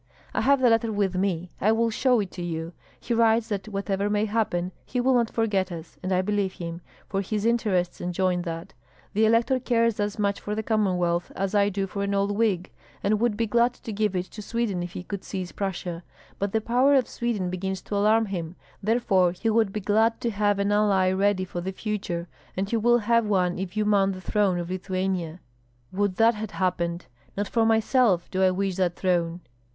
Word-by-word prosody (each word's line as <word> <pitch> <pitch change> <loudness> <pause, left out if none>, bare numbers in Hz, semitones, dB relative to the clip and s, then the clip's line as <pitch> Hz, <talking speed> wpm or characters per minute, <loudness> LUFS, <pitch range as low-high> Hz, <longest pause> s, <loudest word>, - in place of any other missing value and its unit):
"I - - 0
have 275 0 +3
the 250 - +5
letter 225 0 +2
with 200 -3 0
me; 180 -2 -1
I 215 - +4
will 230 +1 +2
show 250 +1 +3
it 195 - -5
to 180 - -7
you. 165 0 -4 0.3
He 240 - -3
writes 225 0 +3
that 200 -2 -3
whatever 200 -1 -1
may 210 +1 +1
happen 205 -5 -1
he 250 - -3
will 260 +2 +3
not 235 -2 +2
forget 200 -5 0
us; 165 -1 -8
and 185 - -3
I 185 0 +2
believe 200 -1 0
him, 170 0 -6 0.3
for 195 -1 -1
his 210 +2 -2
interests 205 -7 +1
enjoin 180 0 0
that. 165 -1 -6 0.4
The 220 +2 +3
elector 235 +4 +3
cares 230 -3 +1
as 205 0 -1
much 200 -1 0
for 210 - -4
the 220 - -2
Commonwealth 180 -6 0
as 195 +1 -2
I 205 -1 +4
do 195 0 -2
for 200 +1 -5
an 200 0 0
old 200 +1 +1
wig, 200 -5 0 0.3
and 210 +1 +2
would 230 -2 +1
be 230 - +1
glad 235 +3 +2
to 225 -3 -7
give 210 -1 0
it 180 0 -1
to 215 - -8
Sweden 210 -4 -2
if 175 0 -5
he - - -6
could 200 +1 -6
seize 185 -3 -5
Prussia; 180 -3 -4 0.4
but 200 0 -1
the 220 - +1
power 250 +5 +3
of 260 -3 +3
Sweden 210 -7 -2
begins 190 0 -3
to 205 - -4
alarm 215 +2 +3
him, 175 -4 -5 0.3
therefore 195 -5 +2
he 225 +5 -1
would 220 -2 +2
be 210 - -4
glad 220 +3 +2
to 235 - 0
have 205 -1 +1
an 200 +1 0
ally 200 -3 +3
ready 190 0 +1
for 175 -1 -5
the 190 +2 -3
future; 190 -4 -3 0.3
and 195 +1 0
he - - +2
will 240 +2 +4
have 230 0 +2
one 180 -3 +1
if 190 +2 -5
you 215 - +2
mount 200 -2 +3
the 185 - -7
throne 195 -1 +1
of 175 0 -4
Lithuania." 185 -2 -2 0.5
"Would 200 -1 0
that 225 +2 +5
had 215 -1 -6
happened! 175 -2 -1 0.3
Not 205 0 -1
for 225 +1 +2
myself 225 -4 +2
do 190 - -1
I 190 - +5
wish 190 0 -1
that 180 -2 +1
throne!" 175 -2 0
200 Hz, 215 wpm, -26 LUFS, 185-220 Hz, 0.5 s, the